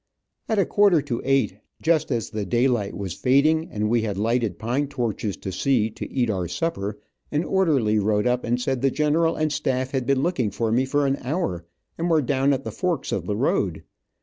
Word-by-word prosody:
At 220 - +1
a 195 - +4
quarter 200 -5 +4
to 120 -5 -3
eight, 130 -8 +1 0.2
just 160 -3 +1
as 115 -5 -2
the 105 -1 -3
daylight 120 0 0
was 95 -4 -4
fading, 155 - +2
and 105 0 -1
we 115 +1 +2
had 105 -3 -3
lighted 115 -3 0
pine 125 +6 -1
torches 115 -6 -3
to 95 - -6
see 115 0 +1
to - - -7
eat 125 -3 +1
our 95 -5 -1
supper, 100 - -3 0.3
an 150 +2 +1
orderly 145 - +2
rode 105 +1 +1
up 125 0 +1
and 120 +1 0
said 125 0 -1
the 135 - +3
general 155 +4 +1
and 155 -1 0
staff 130 -2 -1
had 130 -3 -2
been 135 -1 +2
looking 135 - 0
for 110 +2 -2
me 125 +3 +2
for 145 +2 +1
an 135 0 +1
hour, 125 - -2 0.3
and 170 +1 0
were 160 -3 +3
down 135 +1 +2
at 135 -1 0
the - - -5
forks 180 -3 -2
of - - -2
the 105 -1 -1
road. 100 - 0
125 Hz, 210 wpm, -24 LUFS, 105-145 Hz, 0.3 s, a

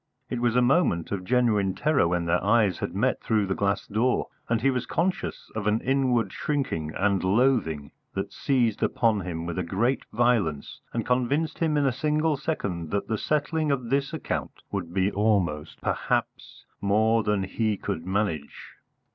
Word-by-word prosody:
It 125 - -2
was 120 -1 +2
a 125 - +4
moment 120 - +2
of 100 -3 -2
genuine 105 -4 +2
terror 150 - +2
when 85 0 0
their 85 +1 +1
eyes 105 -3 +3
had 85 - -4
met 125 +6 +1
through 110 -3 +1
the 95 - -1
glass 100 0 0
door, 115 +5 0 0.2
and 115 -1 +2
he 135 +4 +3
was 125 -1 -2
conscious 180 +3 -2
of 105 -1 -3
an 105 +1 +2
inward 130 -3 +1
shrinking 130 - -2
and 100 -1 +1
loathing 95 - +1 0.2
that - - -3
seized 120 -6 +1
upon 110 -3 +2
him 85 -2 -4
with 85 +2 -2
great 120 +9 0
violence 110 -11 0
and 115 -2 -2
convinced 135 +6 0
him 160 -3 +1
in 145 - +2
a 135 - +3
single 150 +4 +1
second 100 - -3
that 100 +4 -2
the 110 - 0
settling 155 +1 0
of 125 -4 -1
this 140 +1 +1
account 160 - -4
would 90 -4 -3
be 95 +2 +1
almost, 100 -8 0
perhaps, - - -2 0.2
more 110 +3 +3
than 105 -2 0
he 105 +2 -1
could 80 - -4
manage. 95 -6 -3
110 Hz, 170 wpm, -26 LUFS, 95-130 Hz, 0.2 s, a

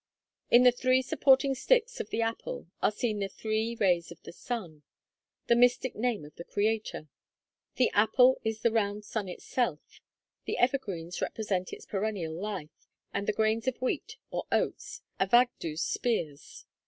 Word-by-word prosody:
In 240 +1 +7
the 250 - +8
three 255 +1 +2
supporting 270 +1 +4
sticks 485 - +1
of - - -4
the 230 - 0
apple 225 0 -4 0.2
are - - +4
seen 215 -1 -2
the 200 - -1
three 220 +2 -2
rays 180 -6 +1
of 170 - -11
the - - -9
sun, 175 -6 -6 0.3
/|\, - - -62
the 235 - +4
mystic 245 +1 +3
Name 225 -7 -1
of 150 - -13
the 170 - -7
Creator; 210 -5 -1 0.7
the 255 - +3
apple 250 +5 +4
is 220 0 -2
the 235 - +4
round 210 -2 0
sun 210 -5 -3
itself; 180 -3 -3 0.4
the - - -2
evergreens 195 -10 -1
represent 190 -4 -2
its - - -9
perennial 195 -5 -2
life; 180 -3 -6 0.3
and 200 0 -2
the - - +3
grains 220 +3 +1
of 260 - 0
wheat, 255 - -2
or - - -3
oats, - - -1 0.2
Avagddu's 190 -6 +2
spears. 160 -12 -3
220 Hz, 160 wpm, -29 LUFS, 190-245 Hz, 0.7 s, the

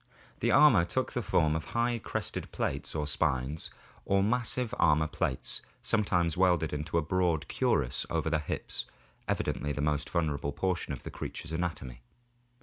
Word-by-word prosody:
The - - +1
armor 135 - +7
took 130 +10 -1
the 120 - -1
form 80 -6 +2
of 80 - -2
high 120 0 +2
crested - - -4
plates 70 +3 -2
or 75 -1 0
spines, 75 -1 -1 0.3
or 100 0 +2
of - - +2
massive 125 +1 0
armor 80 -1 +4
plates 65 -4 -2 0.2
sometimes 90 -7 +2
welded 90 -4 +3
into 75 +2 -2
a 85 - +2
broad 85 -1 +1
cuirass 65 -4 0
over 80 -1 0
the 80 - +2
hips, 75 - -2 0.4
evidently 75 0 -1
the 70 - -2
most 75 0 0
vulnerable 75 -4 -1
portion 90 -3 -1
of 70 - -5
the - - -6
creature's 80 - -6
anatomy. 80 -8 -3
80 Hz, 160 wpm, -30 LUFS, 75-95 Hz, 0.4 s, armor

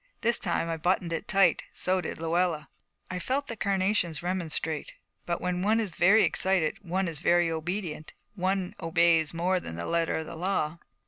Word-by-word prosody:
This 235 +1 +3
time 170 -2 0
I 165 -1 -2
buttoned 175 +1 0
it 165 - -4
tight; 195 -4 +4
so 185 0 0
did 160 - -5
Luella. 165 -2 0 0.4
I 180 - -3
felt 265 +9 -1
the 230 - -5
carnations 190 -6 0
remonstrate, 165 -4 -2 0.3
but 170 -1 -1
when 180 0 -1
one 215 +4 +3
is 215 -5 -2
very 195 +7 +5
excited 185 -5 +1
one 185 +1 -1
is 160 -3 -4
very 175 0 +3
obedient: 160 -1 -4 0.2
one 190 -1 -1
obeys 165 -1 +3
more 180 +2 +1
than 80 - -7
the 85 - -4
letter 170 0 0
of 160 - -3
the - - -8
law. 170 -2 -1
175 Hz, 180 wpm, -28 LUFS, 165-190 Hz, 0.4 s, very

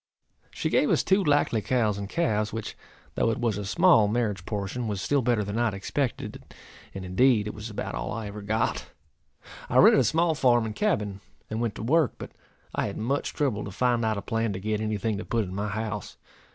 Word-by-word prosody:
She - - -3
gave - - +3
us - - +3
two 195 +1 +3
likely 145 -7 +2
cows 110 -2 +1
and 100 -1 -5
calves, 110 -10 0
which, 110 -1 -5 0.4
though - - +1
it 115 - -1
was 115 -4 0
a - - -4
small 155 - +5
marriage 105 -4 -1
portion, 105 +3 -3
was 105 -3 -2
still 140 +8 +1
better 120 -3 +1
than 100 +3 -3
I 120 - +2
had 110 - 0
expected, 125 +6 -3 0.5
and, 95 -1 -5
indeed, 105 +4 +3
it 105 - -4
was 105 +2 -7
about 105 - -5
all - - -4
I 115 -1 -4
ever 105 +1 -7
got. 110 +2 -1 0.8
I - - +1
rented - - +7
a - - +3
small 160 +7 +2
farm 120 -5 +3
and 110 - -4
cabin, 105 - -1 0.3
and 110 +1 -2
went 115 -3 -1
to - - -6
work; 150 +2 +3
but - - -8 0.4
I - - 0
had - - -6
much 135 +6 -1
trouble 130 -9 -1
to - - -6
find 120 +3 +1
out 110 -1 0
a 100 - -5
plan 115 -2 -1
to 95 - -4
get 105 +2 -2
any 110 -1 -1
thing 105 0 -2
to - - -4
put 115 -1 0
in 90 -2 -7
my 100 +2 -2
house. 105 -1 -4
110 Hz, 225 wpm, -27 LUFS, 105-125 Hz, 0.8 s, rented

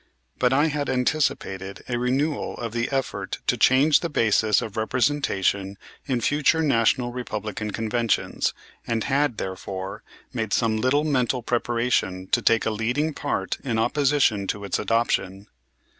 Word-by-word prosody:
But 125 -1 +3
I 145 +3 +4
had 145 -3 -1
anticipated 125 -8 -1
a 120 -1 -1
renewal 135 +5 -1
of 115 -2 -4
the 120 0 -1
effort 135 -1 -2
to - - +2
change 140 +3 +5
the 170 - -3
basis 110 -5 +3
of 110 - -6
representation 110 -5 0 0.3
in 125 -4 0
future 150 +5 +2
National 120 -2 +2
Republican 110 -3 -4
Conventions, 115 +2 0 0.4
and 115 -2 0
had, 140 -3 +1
therefore, 95 +1 -5 0.3
made 110 -4 -2
some 110 -2 +2
little 130 +6 +2
mental 130 -4 0
preparation 115 -6 0
to 120 - +2
take 115 0 +3
a 110 - +1
leading 125 +9 -1
part 145 0 -2
in 120 -5 -1
opposition 130 -5 +2
to 100 - -3
its 100 - -1
adoption. 100 -4 0
120 Hz, 145 wpm, -24 LUFS, 110-135 Hz, 0.4 s, change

